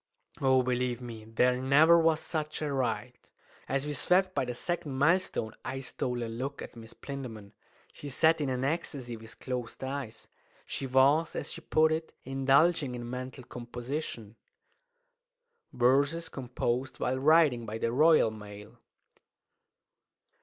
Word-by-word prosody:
Oh, 130 Hz, -1 st, +4 dB
believe 125 Hz, -1 st, -1 dB
me, 115 Hz, -3 st, -8 dB
there 125 Hz, +3 st, +2 dB
never 155 Hz, +6 st, +6 dB
was 160 Hz, -1 st, +3 dB
such 155 Hz, -1 st, -3 dB
a 145 Hz, -2 st, -1 dB
ride! 120 Hz, -2 st, -2 dB, 0.5 s
As 135 Hz, +1 st, 0 dB
we 150 Hz, -, -3 dB
swept 185 Hz, +6 st, +2 dB
by 135 Hz, -, 0 dB
the 125 Hz, 0 st, -4 dB
second 175 Hz, +1 st, -3 dB
mile 165 Hz, +7 st, +5 dB
stone 110 Hz, -, -4 dB
I 135 Hz, +1 st, -4 dB
stole 125 Hz, -2 st, -3 dB
a -, -, -2 dB
look 125 Hz, +5 st, -5 dB
at -, -, -10 dB
Miss 115 Hz, -1 st, -11 dB
Plinlimmon. 120 Hz, -8 st, -7 dB, 0.4 s
She 145 Hz, -, -8 dB
sat 160 Hz, +4 st, +3 dB
in 140 Hz, -, 0 dB
an 130 Hz, 0 st, -1 dB
ecstasy, 140 Hz, -5 st, -3 dB
with 110 Hz, 0 st, -12 dB
closed 125 Hz, -1 st, -5 dB
eyes. 130 Hz, -4 st, -5 dB, 0.4 s
She 135 Hz, -, -3 dB
was, 140 Hz, +5 st, +3 dB
as -, -, -4 dB
she -, -, -7 dB
put 155 Hz, 0 st, +3 dB
it, 160 Hz, 0 st, -3 dB
indulging 135 Hz, +2 st, +2 dB
in 120 Hz, -1 st, -6 dB
mental 130 Hz, +1 st, -6 dB
composition. 120 Hz, -2 st, -6 dB, 1.3 s
Verses 140 Hz, +7 st, +2 dB
composed 130 Hz, 0 st, -3 dB
while 130 Hz, +1 st, 0 dB
Riding 145 Hz, -5 st, +4 dB
by 110 Hz, +1 st, -4 dB
the 115 Hz, +1 st, -1 dB
Royal 155 Hz, -3 st, +5 dB
Mail. 105 Hz, +2 st, -11 dB
130 Hz, 145 wpm, -30 LUFS, 120-150 Hz, 1.3 s, never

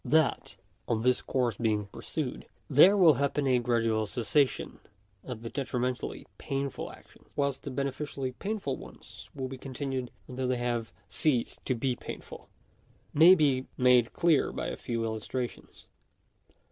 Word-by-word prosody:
That, 160 Hz, -2 st, +2 dB, 0.3 s
on 110 Hz, -1 st, 0 dB
this 125 Hz, 0 st, +3 dB
course 120 Hz, -5 st, 0 dB
being 110 Hz, -3 st, +1 dB
pursued, 125 Hz, +6 st, -5 dB, 0.2 s
there 175 Hz, +9 st, +7 dB
will 170 Hz, -5 st, +7 dB
happen 140 Hz, 0 st, +1 dB
a 130 Hz, -2 st, +4 dB
gradual 115 Hz, -3 st, +1 dB
cessation 125 Hz, +6 st, 0 dB, 0.4 s
of 120 Hz, -3 st, -7 dB
the 115 Hz, -, -4 dB
detrimentally 125 Hz, -2 st, -2 dB
painful 135 Hz, -1 st, -3 dB
actions, -, -, -18 dB
whilst 140 Hz, -2 st, 0 dB
the -, -, -6 dB
beneficially 140 Hz, 0 st, -3 dB
painful 195 Hz, -, -3 dB
ones -, -, -12 dB
will 135 Hz, -2 st, -3 dB
be 130 Hz, 0 st, -8 dB
continued 130 Hz, -1 st, -4 dB, 0.2 s
until 130 Hz, 0 st, -3 dB
they 125 Hz, 0 st, +1 dB
have 120 Hz, -2 st, -2 dB, 0.2 s
ceased 130 Hz, -7 st, 0 dB
to 130 Hz, -, +2 dB
be 125 Hz, +2 st, 0 dB
painful, -, -, -9 dB, 0.6 s
may 165 Hz, +5 st, +8 dB
be 135 Hz, -6 st, +2 dB
made 125 Hz, -2 st, +5 dB
clear 165 Hz, -4 st, +3 dB
by -, -, -3 dB
a -, -, -4 dB
few 115 Hz, -1 st, -3 dB
illustrations. 115 Hz, +3 st, -5 dB
130 Hz, 145 wpm, -29 LUFS, 120-140 Hz, 0.6 s, may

